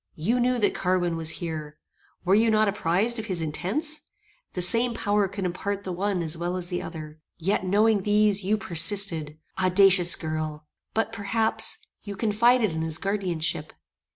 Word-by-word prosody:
"You 220 +11 -1
knew 250 +1 +1
that 210 -3 +1
Carwin 180 -2 -1
was 165 0 -4
there. 155 -3 -6 0.5
Were 185 - +2
you 225 +3 +3
not 215 0 +2
apprized 205 +4 0
of 220 - -6
his 185 -4 -2
intents? 210 - -2 0.5
The 180 - -4
same 235 +5 +5
power 205 -2 0
could 195 0 -6
impart 200 +3 -4
the 190 - -5
one 185 0 -2
as 160 0 -2
well 175 +2 -4
as 175 -1 -2
the 180 -1 -3
other. 155 -2 -9 0.2
Yet, 185 +3 -1
knowing 210 +2 +2
these, 205 0 +1
you 210 +3 0
persisted. 165 -4 +2 0.2
Audacious 185 -1 +5
girl! 155 -1 -5 0.3
but, 225 0 -1
perhaps, 220 +1 +2 0.2
you 205 -1 -8
confided 225 +1 +2
in 160 0 -4
his 160 -1 -1
guardianship. 175 -6 -2
195 Hz, 165 wpm, -25 LUFS, 165-215 Hz, 0.5 s, same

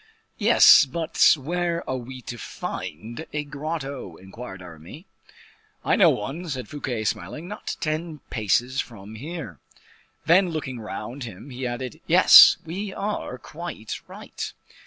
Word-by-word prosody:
"Yes, - - +8
but 160 +5 +3
where 170 +4 -2
are 130 - -1
we 130 +1 -9
to 120 - -7
find 115 - -6
a 150 0 -1
grotto?" 140 - -5
inquired 95 +3 -10
Aramis. 85 - -12 0.8
"I - - +3
know - - +6
one," 155 +12 -3
said 130 -4 -4
Fouquet, 130 -6 -4
smiling, 110 - -4
"not 210 +3 -5
ten 155 +1 -2
paces 120 +4 +1
from 105 -3 -11
here." 135 - -7 0.7
Then 180 +2 +5
looking 130 -6 -4
round 115 +5 -6
him, 115 +5 -10
he 125 0 -4
added: 120 0 -5
"Yes, - - +9
we 190 +5 -4
are 200 -10 -4
quite 150 -3 -7
right." - - -7
130 Hz, 135 wpm, -24 LUFS, 110-160 Hz, 0.8 s, Yes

